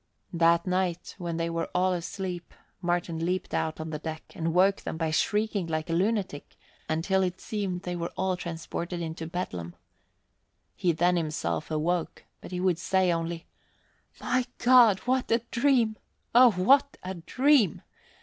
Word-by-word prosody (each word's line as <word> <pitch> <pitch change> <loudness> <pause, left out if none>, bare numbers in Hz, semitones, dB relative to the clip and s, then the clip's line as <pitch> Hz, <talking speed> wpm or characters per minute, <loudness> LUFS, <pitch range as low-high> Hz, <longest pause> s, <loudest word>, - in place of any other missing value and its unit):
That 170 0 +3
night, 180 -2 -1
when 170 -2 -3
they 165 0 -1
were 165 0 -2
all 185 +1 +3
asleep, 180 0 -5 0.3
Martin 175 -2 -1
leaped 180 +2 -2
out 160 0 -1
on 160 0 -5
the 150 - -4
deck 160 0 -6
and 165 0 -1
woke 190 +3 +4
them - - -6
by 160 -1 -1
shrieking 210 +2 0
like 155 0 -2
a - - +1
lunatic, 190 -4 -1 0.3
until 175 +5 +1
it 185 -1 -1
seemed 195 -4 -3
they 180 0 -3
were 170 0 -4
all 190 0 0
transported 170 0 -5
into 160 -1 -5
Bedlam. 90 - -5 1.0
He 175 - +1
then 175 +2 +2
himself 155 -1 -2
awoke, 165 +2 -1 0.2
but - - -9
he 180 0 -4
would 180 -2 +1
say 185 0 +2
only, 165 0 -3 0.7
"My 255 0 0
God, 240 -5 +6
what 255 0 0
a 230 0 +2
dream! 235 -4 +2 0.4
Oh, 245 +1 +8
what 265 +9 +3
a 185 +1 -4
dream!" 240 - +2
180 Hz, 160 wpm, -28 LUFS, 165-195 Hz, 1.0 s, Oh